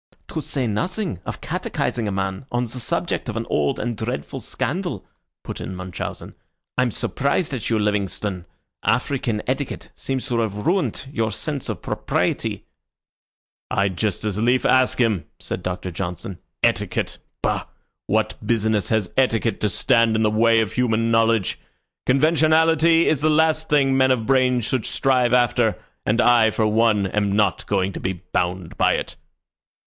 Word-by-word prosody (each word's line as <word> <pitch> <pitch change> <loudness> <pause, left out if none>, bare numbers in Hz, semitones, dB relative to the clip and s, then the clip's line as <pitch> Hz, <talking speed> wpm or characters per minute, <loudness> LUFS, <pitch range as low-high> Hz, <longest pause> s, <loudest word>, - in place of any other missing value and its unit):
'" - - -42
"To 160 - -3
say 135 -2 -2
nothing 165 - -2
of - - -5
catechising 115 -3 -2
a - - -1
man 95 +4 -3
on 120 0 0
the 125 +1 -5
subject 115 - -2
of - - -3
an - - -2
old 70 -1 +1
and 120 -2 -2
dreadful 110 -10 -4
scandal," - - -3 0.4
put - - -6
in 95 - -5
Munchausen. 90 -1 -6 0.4
"I'm 125 -1 +2
surprised 140 - -1
at 125 -5 -3
you, 115 - +2
Livingstone. 100 -3 -1 0.4
African 120 -6 0
etiquette 135 +2 -3
seems 135 -1 -3
to 120 -2 +1
have 110 -3 -1
ruined 170 - 0
your 115 -5 -1
sense 140 +3 -4
of 105 -8 -4
propriety." - - -1 1.0
"I'd 100 -1 +1
just 105 +1 -1
as 105 -1 -1
lief 125 +2 +2
ask 130 -1 +4
him," 110 -8 +2
said - - -4
Doctor 90 +1 -4
Johnson. 90 +1 -5 0.2
"Etiquette? - - 0 0.2
Bah! - - 0 0.4
What 110 +1 0
business 110 -2 +1
has 110 -5 0
etiquette 115 -3 +1
to 105 - +2
stand 115 +1 +3
in 110 - +2
the 105 - +3
way 115 +1 +4
of 105 -4 -2
human 115 -2 +1
knowledge? 115 -3 +2 0.5
Conventionality 160 +3 +4
is 150 -3 +2
the 155 - +3
last 160 0 +2
thing 140 -2 +3
men 130 0 +4
of 125 -4 +1
brains 125 -2 +3
should 125 -1 -1
strive 125 -3 +2
after, 120 -2 +3 0.3
and 110 +2 +2
I, 120 -2 +5
for 110 0 0
one, 110 -1 +3
am 100 +1 0
not 105 -3 +1
going 95 -1 0
to - - -5
be 95 - -1
bound 90 -1 -3
by - - +4
it." - - -3
115 Hz, 165 wpm, -22 LUFS, 100-130 Hz, 1.0 s, I